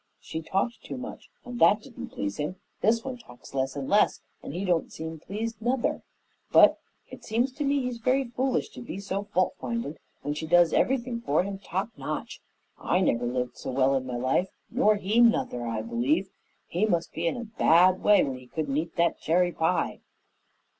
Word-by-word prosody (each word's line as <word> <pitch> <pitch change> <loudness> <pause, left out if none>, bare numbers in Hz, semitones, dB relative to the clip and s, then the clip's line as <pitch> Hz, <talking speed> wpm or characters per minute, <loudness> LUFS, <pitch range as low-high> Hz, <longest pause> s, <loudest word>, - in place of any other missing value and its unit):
She 160 - -6
talked 195 +8 -1
too - - -7
much, 255 +1 -8 0.2
and 245 -1 -6
that 210 -1 +5
didn't 260 -4 -8
please 100 0 -4
him; 150 +5 -3 0.3
this 230 +1 +3
one 260 -2 -5
talks 215 - -15
less 135 0 -1
and 140 -2 -4
less, 205 - +3 0.2
and - - -7
he 180 +6 -3
don't 175 -3 +1
seem 160 0 -6
pleased, 220 +6 -5
nuther, 245 +2 0 0.5
but - - +7 0.3
it - - -10
seems 240 +4 0
to 290 +3 -4
me 280 0 +2
he's 250 -2 -3
very 260 +3 +2
foolish 255 +1 -1
to - - -10
be 240 - -6
so 200 0 -3
fault 185 -3 +1
findin' 235 -10 -4 0.2
when 145 - -1
she 155 +2 -5
does 175 0 +5
everything 245 -2 +1
for 155 -6 +2
him 195 0 -5
top 190 +2 -3
notch. - - -5 0.4
I 180 - +1
never 120 -9 +1
lived 125 0 -2
so - - -5
well 130 +1 +3
in 130 -1 -1
my 125 -1 -3
life, 130 +9 +1 0.2
nor 225 -3 +4
he, 205 +3 +1
nuther, 125 - +2
I 110 -1 -2
believe. 135 - 0 0.3
He 190 +6 0
must 170 -5 0
be 170 +1 -1
in 165 - -1
a 240 - -4
bad 185 -4 +4
way 210 -1 +6
when 130 -2 -3
he 125 - -15
couldn't 145 0 -3
eat 160 +2 -3
that 170 0 +2
cherry 175 +2 +2
pie." 165 +2 0
185 Hz, 200 wpm, -27 LUFS, 150-230 Hz, 0.5 s, but